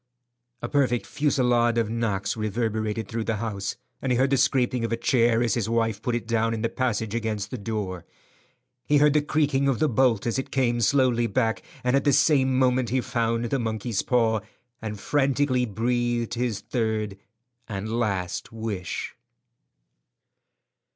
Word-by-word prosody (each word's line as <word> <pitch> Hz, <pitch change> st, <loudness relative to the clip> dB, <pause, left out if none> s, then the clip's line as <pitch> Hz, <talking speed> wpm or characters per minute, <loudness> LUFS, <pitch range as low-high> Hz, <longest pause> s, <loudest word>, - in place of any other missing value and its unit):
A -, -, -1 dB
perfect 130 Hz, -5 st, +1 dB
fusillade 125 Hz, -5 st, +2 dB
of 115 Hz, -2 st, +1 dB
knocks 115 Hz, -4 st, -1 dB
reverberated 110 Hz, -1 st, -2 dB
through 115 Hz, +1 st, -3 dB
the 115 Hz, -, 0 dB
house, 100 Hz, -2 st, -3 dB, 0.3 s
and 130 Hz, -, -1 dB
he 125 Hz, -, +3 dB
heard 130 Hz, +2 st, +2 dB
the 135 Hz, -, +4 dB
scraping 130 Hz, -2 st, +2 dB
of 115 Hz, -, -2 dB
a 115 Hz, -, 0 dB
chair 115 Hz, -1 st, +3 dB
as 115 Hz, -, +1 dB
his 110 Hz, -3 st, -1 dB
wife 115 Hz, -2 st, 0 dB
put 120 Hz, 0 st, -1 dB
it 120 Hz, -, -3 dB
down 115 Hz, 0 st, +1 dB
in 110 Hz, -, -4 dB
the 115 Hz, -, +1 dB
passage 110 Hz, -4 st, -1 dB
against 110 Hz, -3 st, -2 dB
the 125 Hz, -, -3 dB
door. 100 Hz, -5 st, -4 dB, 0.8 s
He 145 Hz, -, +4 dB
heard 145 Hz, 0 st, +5 dB
the 150 Hz, -, +4 dB
creaking 145 Hz, -2 st, +1 dB
of 135 Hz, -3 st, +2 dB
the 155 Hz, -, +2 dB
bolt 125 Hz, -4 st, +2 dB
as 120 Hz, +2 st, 0 dB
it 135 Hz, -, -5 dB
came 120 Hz, -3 st, +1 dB
slowly 120 Hz, 0 st, +3 dB
back, 115 Hz, -2 st, 0 dB, 0.2 s
and 125 Hz, +1 st, +2 dB
at 140 Hz, -, +2 dB
the 145 Hz, -, +3 dB
same 135 Hz, -2 st, +3 dB
moment 130 Hz, -1 st, +2 dB
he 130 Hz, -, +1 dB
found 115 Hz, -1 st, -1 dB
the 135 Hz, +3 st, -1 dB
monkey's 110 Hz, -1 st, -2 dB
paw, 115 Hz, -3 st, +2 dB, 0.4 s
and 105 Hz, -2 st, -5 dB
frantically 135 Hz, -1 st, +1 dB
breathed 120 Hz, +2 st, -1 dB
his 120 Hz, -3 st, -2 dB
third 110 Hz, -4 st, -2 dB, 0.5 s
and 110 Hz, +3 st, -3 dB
last 95 Hz, -6 st, -2 dB
wish. 110 Hz, -6 st, -4 dB
115 Hz, 170 wpm, -25 LUFS, 110-130 Hz, 0.8 s, heard